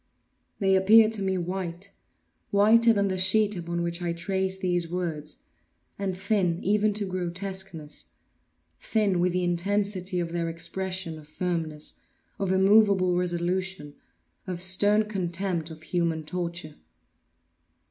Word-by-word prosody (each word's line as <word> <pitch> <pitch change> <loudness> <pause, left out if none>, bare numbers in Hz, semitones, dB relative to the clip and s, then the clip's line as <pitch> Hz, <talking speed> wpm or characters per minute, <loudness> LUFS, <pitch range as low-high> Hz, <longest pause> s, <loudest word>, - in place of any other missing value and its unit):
They 195 -2 +3
appeared 215 +4 +6
to 210 - -2
me 190 -1 0
white—whiter 195 +5 0
than 200 -2 +2
the 185 -1 -1
sheet 205 +2 +3
upon 170 0 -3
which 170 +1 -3
I 170 -1 -1
trace 190 +2 -2
these 175 -3 -1
words—and 175 +3 -6
thin 190 -4 0
even 210 +1 +2
to 210 -1 -2
grotesqueness; 185 -3 -4 0.7
thin 205 -5 +1
with 180 +1 +2
the 180 0 0
intensity 185 +1 0
of 170 -1 -3
their 170 -1 -1
expression 170 0 -4
of 150 - -15
firmness—of 165 +3 -4
immoveable 190 -1 +4
resolution—of 175 - -4
stern 205 +4 +3
contempt 185 -4 -3
of 160 0 -11
human 165 -2 -1
torture. 170 -2 -5
185 Hz, 115 wpm, -27 LUFS, 170-195 Hz, 0.7 s, appeared